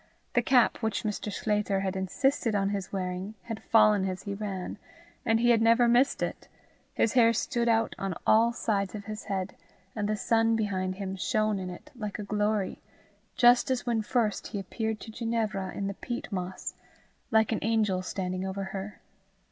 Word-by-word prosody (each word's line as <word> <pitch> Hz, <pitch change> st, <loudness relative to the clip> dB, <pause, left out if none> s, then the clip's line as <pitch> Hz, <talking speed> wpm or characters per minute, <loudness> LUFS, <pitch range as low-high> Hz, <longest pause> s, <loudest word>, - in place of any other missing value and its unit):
The 245 Hz, -, +4 dB
cap 245 Hz, 0 st, +4 dB
which 220 Hz, -2 st, -2 dB
Mr. 210 Hz, 0 st, -3 dB
Sclater 210 Hz, -2 st, 0 dB
had 190 Hz, 0 st, -2 dB
insisted 225 Hz, +5 st, 0 dB
on 195 Hz, -1 st, +1 dB
his 200 Hz, -2 st, -3 dB
wearing 185 Hz, +2 st, -3 dB
had 225 Hz, -2 st, -6 dB
fallen 210 Hz, -4 st, +4 dB
as 185 Hz, 0 st, -5 dB
he 200 Hz, -, -4 dB
ran, 200 Hz, -2 st, -5 dB, 0.5 s
and 225 Hz, 0 st, +4 dB
he 240 Hz, +1 st, +4 dB
had 230 Hz, -1 st, +4 dB
never 230 Hz, +2 st, +5 dB
missed 245 Hz, +4 st, +3 dB
it; -, -, -4 dB, 0.5 s
his 225 Hz, -, +2 dB
hair 230 Hz, -2 st, +5 dB
stood 235 Hz, +1 st, 0 dB
out 225 Hz, 0 st, +2 dB
on 195 Hz, -3 st, -2 dB
all 230 Hz, +2 st, +5 dB
sides 200 Hz, -4 st, -1 dB
of 205 Hz, -1 st, -7 dB
his 215 Hz, -1 st, -6 dB
head, 190 Hz, -1 st, -3 dB, 0.4 s
and 210 Hz, -2 st, -1 dB
the 215 Hz, -, +1 dB
sun 225 Hz, +1 st, +2 dB
behind 190 Hz, -4 st, -1 dB
him 190 Hz, -1 st, -4 dB
shone 215 Hz, +1 st, +1 dB
in 185 Hz, -1 st, -4 dB
it 180 Hz, +12 st, -10 dB
like 210 Hz, -4 st, -5 dB
a 210 Hz, -, -5 dB
glory, 210 Hz, -1 st, -1 dB, 0.5 s
just 245 Hz, +1 st, +5 dB
as 260 Hz, -2 st, 0 dB
when 235 Hz, -2 st, +1 dB
first 215 Hz, -1 st, 0 dB
he 205 Hz, -, -4 dB
appeared 220 Hz, +3 st, -3 dB
to 220 Hz, -, -8 dB
Ginevra 220 Hz, -5 st, -2 dB
in 200 Hz, -, -2 dB
the 200 Hz, -, -2 dB
peat 240 Hz, +4 st, -6 dB
moss, 185 Hz, -1 st, -4 dB, 0.6 s
like 220 Hz, -2 st, +3 dB
an 225 Hz, -, 0 dB
angel 210 Hz, -4 st, +1 dB
standing 185 Hz, 0 st, -3 dB
over 190 Hz, +1 st, -3 dB
her. 195 Hz, +1 st, -6 dB
210 Hz, 185 wpm, -28 LUFS, 195-230 Hz, 0.6 s, never